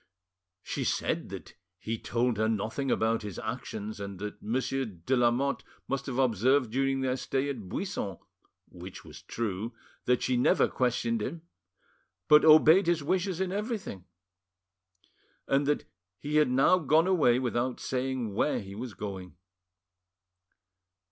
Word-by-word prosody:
She - - -3
said - - -1
that - - -9 0.2
he 110 +3 -4
told 120 -1 0
her 110 +1 +1
nothing 110 +5 -2
about 115 -1 +1
his 105 -4 -7
actions, 105 +1 -5
and 100 -1 -6
that 105 +2 -7
Monsieur 130 +4 -1
de 105 +2 -2
Lamotte 125 +3 +1 0.2
must 135 0 -3
have 130 -2 -3
observed 130 0 +2
during 135 +1 0
their 130 -1 0
stay 135 +1 -1
at 110 -9 -8
Buisson 100 - -3 0.5
(which 90 +1 -10
was - - -11
true) 110 +1 -4 0.3
that 125 -1 +2
she 125 -1 +1
never 125 - +4
questioned 120 -2 0
him, 165 +9 -5 0.8
but 150 0 +7
obeyed 160 +4 +7
his 170 -3 +2
wishes 185 +2 0
in 190 -1 -1
everything; 205 - -4 1.4
and 140 +1 +2
that 150 - 0 0.3
he 150 +8 -1
had 150 -3 +4
now 135 +8 +4
gone 160 +1 +3
away 155 -10 +4
without 125 0 -1
saying 130 -4 -2
where 150 - +1
he 100 -1 -9
was 115 +1 -7
going. 95 -4 -7
125 Hz, 140 wpm, -29 LUFS, 110-145 Hz, 1.4 s, but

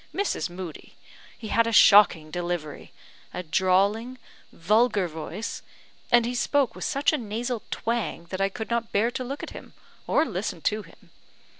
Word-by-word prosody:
Mrs. 395 - -1
Moodie! 175 -3 -9 0.4
he 220 - -8
had 230 +1 +3
a - - 0
shocking 200 -8 +6
delivery, 175 -3 -4 0.4
a 180 - -4
drawling, 195 +8 +1 0.3
vulgar 210 +2 +2
voice; 160 +7 -6 0.5
and 240 -1 +5
he 245 - -2
spoke 260 0 +1
with - - -7
such 285 +2 +1
a 305 - 0
nasal 230 +1 -3
twang 230 -7 -2
that 190 0 -3
I 195 - +2
could 220 +3 -7
not 235 -1 -1
bear 220 +4 +2
to 255 - -4
look 275 +3 -6
at - - -6
him, - - -11 0.3
or 315 - +3
listen 185 - -4
to 215 +6 0
him. - - -19
215 Hz, 165 wpm, -26 LUFS, 185-240 Hz, 0.5 s, shocking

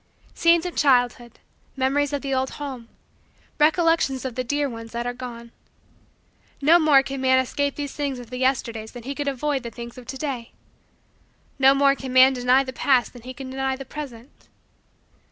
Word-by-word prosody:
Scenes 335 0 +3
of 355 - -5
childhood! 245 -3 +2 0.4
Memories 275 +2 +1
of 285 -1 -3
the 275 -1 -2
old 260 0 0
home! 260 -5 -7 0.7
Recollections 315 -4 +2
of 260 - -3
the 255 +2 -3
dear 285 +3 -1
ones 230 -2 -9
that 235 0 -3
are 245 - -2
gone! 235 -2 -9 1.1
No 320 +5 +5
more 295 -4 +5
can 275 0 -5
man 260 0 +4
escape 280 +2 -1
these 285 -2 -5
things 280 -3 -3
of 245 -1 -11
the 250 - -5
Yesterdays 230 -4 -1
than 245 -2 -9
he 275 +3 -4
can 290 0 -4
avoid 280 +1 -1
the 235 - -6
things 235 +1 -9
of 245 - -14
to 265 - -6
day. 260 -5 -5 1.1
No 270 +1 +6
more 275 0 +4
can 265 -2 -7
man 260 +1 +7
deny 250 +1 +3
the 260 -1 -7
past 255 -2 +2
than 245 - -12
he 255 +2 -8
can 260 0 -8
deny 265 0 -1
the 270 +1 -9
present. 265 -3 -10
265 Hz, 190 wpm, -23 LUFS, 245-280 Hz, 1.1 s, man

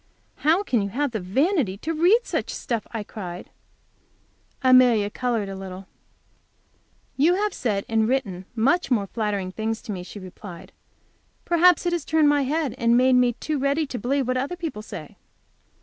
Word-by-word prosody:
"How 325 +7 +2
can 245 - +1
you 200 - -2
have 275 +6 -1
the 220 - -2
vanity 250 - 0
to 320 +10 -3
read 355 +9 +4
such - - -3
stuff?" 230 -4 -3
I 225 -3 -4
cried. 180 -4 -8 1.1
Amelia 250 -5 +5
colored 235 -4 -1
a 195 - -6
little. 190 0 -8 1.3
"You 320 +6 +4
have 415 +2 0
said 205 -5 -2
and 220 0 +1
written 200 -9 -1
much 275 +10 +2
more 225 -6 +2
flattering 200 -3 -2
things 220 +3 -3
to - - -6
me," 185 -3 -4
she 180 - -10
replied. 185 -1 -11 0.7
"Perhaps 350 0 +4
it 350 - +1
has 340 -4 -1
turned 315 -1 +3
my 290 0 +3
head, 300 -1 -1
and 235 0 +4
made 255 +1 +4
me 250 -1 +4
too 300 +5 -3
ready 280 +3 +1
to 260 -3 -6
believe 265 +3 0
what 255 0 0
other 275 +7 -2
people 325 - -5
say." 200 -8 -9
245 Hz, 175 wpm, -24 LUFS, 205-295 Hz, 1.3 s, Amelia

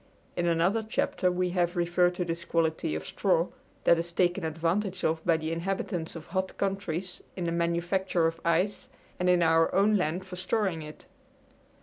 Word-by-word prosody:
In 175 0 0
another 170 +6 +2
chapter 210 -4 0
we 180 0 0
have 175 0 +1
referred 175 +1 +2
to 180 - -1
this 170 0 -3
quality 160 - 0
of 80 - -4
straw, 180 -3 +1 0.3
that 170 - +5
is 170 +1 -4
taken 175 +1 +1
advantage 170 +5 -1
of 160 0 0
by 165 -2 +4
the 160 0 -3
inhabitants 175 0 -3
of 165 -1 -8
hot 190 +1 -3
countries 190 -2 -2
in 185 - -4
the 170 - -1
manufacture 170 +1 +1
of 165 0 -1
ice 170 +5 0 0.3
and 180 0 +2
in 180 -1 +4
our 165 0 +4
own 205 +2 +4
land 180 +1 -1
for 185 -1 -8
storing 185 -2 0
it. 150 0 -10
175 Hz, 180 wpm, -28 LUFS, 165-185 Hz, 0.3 s, that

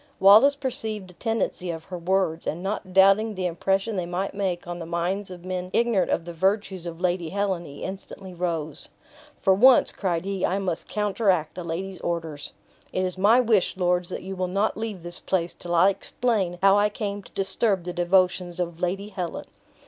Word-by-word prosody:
Wallace 215 +9 +7
perceived 220 -8 -3
the - - -18
tendency 225 -3 -2
of 165 -1 -4
her 180 +2 -7
words, 170 -2 0
and 170 +4 -3
not 195 -1 -3
doubting 195 +3 +5
the 185 -1 -2
impression 195 +5 0
they 175 -2 -2
might 180 +3 -2
make 195 -2 -2
on 175 0 -5
the 165 - -6
minds 180 +4 -2
of 180 -1 -10
men 185 -1 -3
ignorant 230 -5 +2
of 165 - 0
the 170 - -7
virtues 190 0 0
of 165 -1 -7
Lady 175 -2 0
Helen, 190 -2 -1
he 145 -1 -9
instantly 190 0 -7
rose. 165 -4 -3 0.5
"For 190 - +3
once," 250 +6 +6
cried 175 -3 -2
he, 195 -1 -3
"I 190 - +1
must 185 -4 -3
counteract 200 -6 0
a - - -4
lady's 180 +3 -4
orders. 165 -4 -4 0.4
It 185 - 0
is 180 - -3
my 205 +6 +5
wish, 220 -7 +2
lords, 180 -1 +1
that - - -5
you 190 +1 -5
will 185 0 -1
not 195 +4 0
leave 215 -5 -5
this 175 0 -7
place 175 -3 -1
till 175 0 -4
I 185 +4 +6
explain 200 -4 -1
how 195 0 +7
I 210 +1 +3
came 205 -1 -4
to - - -17
disturb 195 -1 0
the 180 0 -5
devotions 180 0 +1
of 170 -2 -3
Lady 195 +3 -2
Helen. 180 -4 -5
185 Hz, 195 wpm, -25 LUFS, 175-200 Hz, 0.5 s, Wallace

